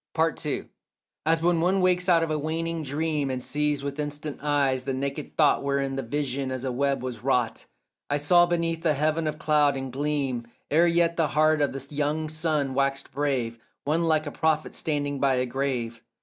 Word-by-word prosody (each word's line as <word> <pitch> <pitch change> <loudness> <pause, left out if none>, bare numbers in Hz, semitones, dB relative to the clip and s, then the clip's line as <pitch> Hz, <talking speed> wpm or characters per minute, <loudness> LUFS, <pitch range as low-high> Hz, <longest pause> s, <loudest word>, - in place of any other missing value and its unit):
PART 160 0 +1
II 150 - -3 0.6
As 165 0 +2
when 170 -1 +3
one 185 +3 +2
wakes 180 0 +2
out 165 -2 +5
of 165 - -2
a 155 - 0
waning 165 +2 -2
dream 150 0 -1
And 130 -1 -2
sees 145 +2 -1
with 140 +1 -4
instant 150 0 -4
eyes 140 -3 +1
the 135 0 -2
naked 140 +2 -4
thought 150 -3 +4
Whereof 140 -1 0
the 135 - -1
vision 135 +1 -2
as 130 0 -4
a 130 - -1
web 140 +1 0
was 125 -4 -5
wrought, 125 -4 0 0.4
I 145 - +1
saw 175 +4 +5
beneath 165 -1 -1
a 155 -3 +3
heaven 155 +2 +1
of 150 0 -2
cloud 150 -2 +3
and 135 -2 -5
gleam, 135 -4 -1 0.2
Ere 165 +4 +5
yet 170 0 +2
the 165 -2 +3
heart 155 0 +4
of 145 - +2
the 135 0 -7
young 150 +2 -1
sun 155 -3 0
waxed 140 0 0
brave, 130 -5 -1 0.2
One 160 +4 +1
like 155 -1 +2
a 145 - -4
prophet 155 0 0
standing 145 -2 -2
by 135 -1 +3
a 125 0 +1
grave. 125 -3 -2
145 Hz, 200 wpm, -26 LUFS, 135-160 Hz, 0.6 s, out